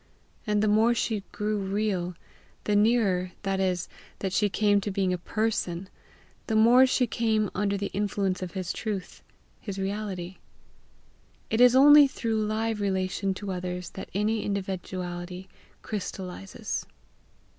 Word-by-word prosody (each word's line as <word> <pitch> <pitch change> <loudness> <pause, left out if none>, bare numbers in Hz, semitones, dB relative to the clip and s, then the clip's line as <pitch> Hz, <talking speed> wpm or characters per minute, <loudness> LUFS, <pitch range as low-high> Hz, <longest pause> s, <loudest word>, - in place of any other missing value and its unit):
And 210 0 +2
the - - +3
more 220 +3 +4
she 220 -3 -1
grew 210 0 -1
real, 190 -3 -1 0.5
the 210 - +1
nearer, 205 -5 +2
that 195 -1 -1
is, 180 -2 0 0.3
that 190 -2 -3
she 210 0 +2
came 205 +1 +2
to 205 - -3
being 190 -2 0
a - - -1
PERSON, 195 -3 -2 0.6
the 220 - 0
more 240 +4 +7
she 255 0 +2
came 220 -3 0
under 200 0 0
the 200 0 -3
influence 195 -2 -1
of 180 -2 -5
his 185 -2 -3
truth, 205 -4 -5 0.4
his 200 -2 -6
reality. 195 -2 -4 1.1
It 225 - +2
is 250 0 +7
only 290 +2 +9
through 225 -4 -1
live 220 0 -1
relation 190 0 -1
to 200 0 -5
others 180 -1 -4
that 190 - -8
any 210 +2 +1
individuality 185 -2 -4 0.4
crystallizes. 185 - -5
200 Hz, 140 wpm, -27 LUFS, 185-215 Hz, 1.1 s, only